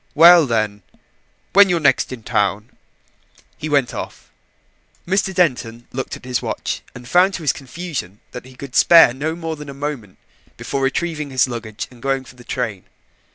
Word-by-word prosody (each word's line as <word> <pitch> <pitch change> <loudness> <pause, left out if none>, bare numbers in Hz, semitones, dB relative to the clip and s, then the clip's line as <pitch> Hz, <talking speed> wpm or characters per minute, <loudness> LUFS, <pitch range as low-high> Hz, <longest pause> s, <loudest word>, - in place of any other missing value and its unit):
Well, 170 0 +8
then, 110 -3 -1 0.7
when 200 0 +7
you're 175 -2 +2
next 140 -4 +2
in 125 -4 -8
town." 105 -1 -1 0.8
He 155 - -6
went 140 -5 +1
off. - - -8 0.8
Mr. 195 +1 +1
Denton 125 -10 0
looked 130 +1 -4
at - - -17
his 125 -1 -1
watch - - -4
and 125 0 -11
found 185 +6 +3
to 170 - -6
his 145 - +2
confusion 135 - -7
that 125 - -8
he 130 0 -15
could 135 0 -10
spare 165 -8 +7
no 155 +5 -3
more 165 -1 -4
than 150 -1 -10
a 140 - -8
moment 140 -9 -5 0.4
before 140 - -3
retrieving 150 +2 -1
his 130 -1 +2
luggage 115 -3 -6
and 120 -2 -17
going 135 0 -1
for 130 - -15
the 125 - -15
train. 115 -7 -4
135 Hz, 175 wpm, -20 LUFS, 120-160 Hz, 0.8 s, Well